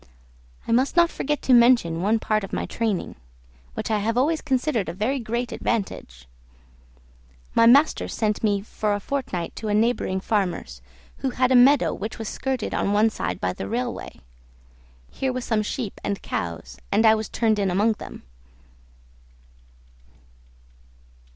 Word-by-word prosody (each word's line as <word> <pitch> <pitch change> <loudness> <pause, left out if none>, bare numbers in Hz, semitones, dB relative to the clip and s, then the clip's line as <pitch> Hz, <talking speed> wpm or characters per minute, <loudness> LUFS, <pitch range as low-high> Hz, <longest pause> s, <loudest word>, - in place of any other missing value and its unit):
I - - -2
must 255 +7 +2
not 340 0 +5
forget 295 +1 -2
to 260 - +3
mention 235 -9 +4
one 210 +4 +2
part 215 -1 -1
of 195 - -7
my - - -2
training, 220 -5 -3 0.6
which - - -3
I 215 - +2
have 225 +3 -1
always 310 +5 +2
considered 260 - 0
a - - -4
very 240 +8 -1
great 235 +1 -3
advantage. 65 - -4 1.3
My 230 - +5
master 280 +6 +4
sent 215 -1 -2
me 205 -2 +2
for 210 0 -2
a - - -3
fortnight 240 -8 -4
to 220 - -5
a 205 - +1
neighboring 215 -4 +1
farmer's, 180 - -2 0.4
who 265 - -2
had 255 0 +1
a - - +5
meadow 270 +4 +5
which 215 +2 -6
was 225 -2 -5
skirted 260 -2 -3
on 200 - 0
one 215 +2 +3
side 90 - -4
by 90 0 -1
the 95 - -6
railway. 125 +4 -4 0.9
Here 265 -1 -2
were 255 - -3
some 225 -3 0
sheep 215 0 -5
and 200 -1 -2
cows, 80 -8 -5
and 225 - +3
I 220 - +7
was 220 -1 -2
turned 220 -2 +1
in 195 -1 +1
among 205 +5 +2
them. - - -10
220 Hz, 160 wpm, -24 LUFS, 195-250 Hz, 1.3 s, I